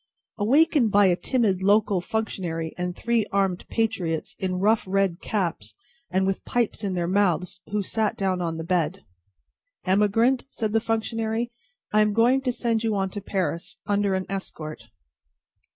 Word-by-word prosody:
Awakened 265 Hz, +2 st, +4 dB
by 205 Hz, 0 st, +5 dB
a 180 Hz, -2 st, +4 dB
timid 205 Hz, -3 st, +1 dB
local 200 Hz, -1 st, +3 dB
functionary 175 Hz, -6 st, -3 dB
and 180 Hz, 0 st, -3 dB
three 235 Hz, +1 st, +1 dB
armed 195 Hz, -2 st, 0 dB
patriots 190 Hz, -8 st, -1 dB
in 185 Hz, -1 st, -1 dB
rough 215 Hz, +4 st, +3 dB
red 195 Hz, -2 st, +1 dB
caps 165 Hz, -, -2 dB, 0.3 s
and 190 Hz, +1 st, +1 dB
with 195 Hz, 0 st, -1 dB
pipes 235 Hz, -2 st, -1 dB
in 195 Hz, -2 st, -1 dB
their 175 Hz, -1 st, 0 dB
mouths, 180 Hz, -2 st, +1 dB
who 210 Hz, 0 st, -1 dB
sat 215 Hz, +2 st, -1 dB
down 190 Hz, -2 st, 0 dB
on 165 Hz, -2 st, -2 dB
the 165 Hz, -, -4 dB
bed. 175 Hz, +1 st, -1 dB, 0.8 s
"Emigrant," 210 Hz, +7 st, +3 dB
said 220 Hz, -5 st, -2 dB
the 225 Hz, -, +3 dB
functionary, 225 Hz, +1 st, -1 dB, 0.4 s
"I 215 Hz, -, +5 dB
am 210 Hz, -1 st, +2 dB
going 240 Hz, +5 st, +4 dB
to 255 Hz, -2 st, 0 dB
send 230 Hz, -2 st, -1 dB
you 220 Hz, -2 st, +1 dB
on 195 Hz, -1 st, -1 dB
to 205 Hz, -, -5 dB
Paris, 180 Hz, -3 st, -3 dB
under 205 Hz, -2 st, +1 dB
an 190 Hz, 0 st, -2 dB
escort." 155 Hz, -9 st, -5 dB
195 Hz, 160 wpm, -25 LUFS, 180-225 Hz, 0.8 s, by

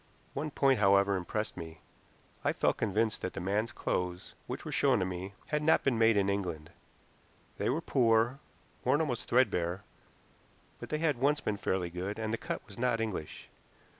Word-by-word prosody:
One 150 Hz, +3 st, -2 dB
point, 135 Hz, -2 st, +3 dB
however, 100 Hz, 0 st, +4 dB
impressed 105 Hz, +4 st, -3 dB
me. 80 Hz, -2 st, -8 dB, 0.6 s
I -, -, +2 dB
felt -, -, +1 dB
convinced 110 Hz, +1 st, 0 dB
that 95 Hz, -, -3 dB
the -, -, -5 dB
man's 100 Hz, +5 st, 0 dB
clothes, 90 Hz, 0 st, -3 dB
which -, -, -5 dB
were -, -, -4 dB
shown -, -, +3 dB
to 95 Hz, -, +1 dB
me, 95 Hz, +2 st, -5 dB
had 150 Hz, 0 st, 0 dB
not 160 Hz, +1 st, +4 dB
been 135 Hz, -3 st, +2 dB
made 115 Hz, -1 st, +5 dB
in 100 Hz, -1 st, +3 dB
England. 90 Hz, -6 st, -2 dB, 0.9 s
They -, -, +1 dB
were 155 Hz, +6 st, 0 dB
poor, 120 Hz, -2 st, +3 dB, 0.4 s
worn 130 Hz, +4 st, +3 dB
almost 125 Hz, -7 st, -2 dB
threadbare, 95 Hz, -7 st, +2 dB, 1.0 s
but -, -, -8 dB
they 155 Hz, -, 0 dB
had 150 Hz, -5 st, +1 dB
once 145 Hz, +3 st, +3 dB
been 105 Hz, -, -2 dB
fairly 90 Hz, -3 st, -1 dB
good, 95 Hz, +4 st, -4 dB
and 110 Hz, 0 st, -2 dB
the 115 Hz, -, -1 dB
cut -, -, -4 dB
was 105 Hz, 0 st, -11 dB
not 120 Hz, -2 st, +1 dB
English. 105 Hz, -9 st, -4 dB
110 Hz, 180 wpm, -31 LUFS, 95-125 Hz, 1.0 s, made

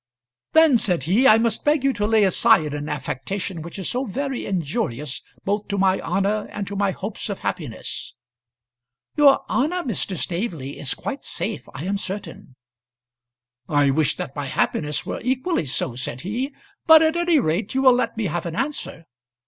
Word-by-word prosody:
"Then," 320 Hz, -5 st, +6 dB
said 180 Hz, -, 0 dB
he, 205 Hz, -, +4 dB
"I 215 Hz, -, +8 dB
must 225 Hz, -1 st, 0 dB
beg 295 Hz, -2 st, +2 dB
you 275 Hz, -1 st, +3 dB
to 210 Hz, -3 st, -1 dB
lay 220 Hz, -1 st, +4 dB
aside 160 Hz, -5 st, +4 dB
an 145 Hz, +1 st, -4 dB
affectation 155 Hz, +6 st, -4 dB
which 170 Hz, +4 st, -8 dB
is 190 Hz, -, -3 dB
so 255 Hz, +2 st, -1 dB
very 270 Hz, +4 st, -3 dB
injurious 145 Hz, -6 st, -2 dB, 0.2 s
both 205 Hz, +1 st, -1 dB
to 200 Hz, -, -2 dB
my 190 Hz, -1 st, +3 dB
honour 205 Hz, +2 st, 0 dB
and 205 Hz, -, -4 dB
to 200 Hz, -, -6 dB
my 200 Hz, 0 st, +1 dB
hopes 200 Hz, +3 st, -5 dB
of 200 Hz, -, -3 dB
happiness." 150 Hz, -, -5 dB, 1.0 s
"Your 290 Hz, -2 st, +5 dB
honour, 345 Hz, +7 st, 0 dB
Mr. 200 Hz, -, -1 dB
Staveley, 170 Hz, -, -3 dB
is 135 Hz, -, 0 dB
quite -, -, -5 dB
safe, -, -, -4 dB
I 135 Hz, -, -5 dB
am 200 Hz, +2 st, 0 dB
certain." 195 Hz, -9 st, -7 dB, 1.1 s
"I 145 Hz, -2 st, +3 dB
wish 150 Hz, +1 st, +1 dB
that 135 Hz, -, -6 dB
my 145 Hz, -1 st, -3 dB
happiness 150 Hz, +2 st, -1 dB
were -, -, -4 dB
equally 260 Hz, -, 0 dB
so," 130 Hz, -1 st, -1 dB
said 125 Hz, 0 st, -4 dB
he. 240 Hz, -, -3 dB, 0.4 s
"But 320 Hz, -1 st, +9 dB
at 320 Hz, +1 st, +2 dB
any 345 Hz, -2 st, +3 dB
rate 195 Hz, +3 st, -1 dB
you 265 Hz, -, +2 dB
will 260 Hz, -2 st, +8 dB
let 245 Hz, -2 st, -1 dB
me 225 Hz, -, -1 dB
have 175 Hz, -1 st, -2 dB
an 165 Hz, -, -5 dB
answer. 270 Hz, -, -3 dB
200 Hz, 180 wpm, -23 LUFS, 155-250 Hz, 1.1 s, But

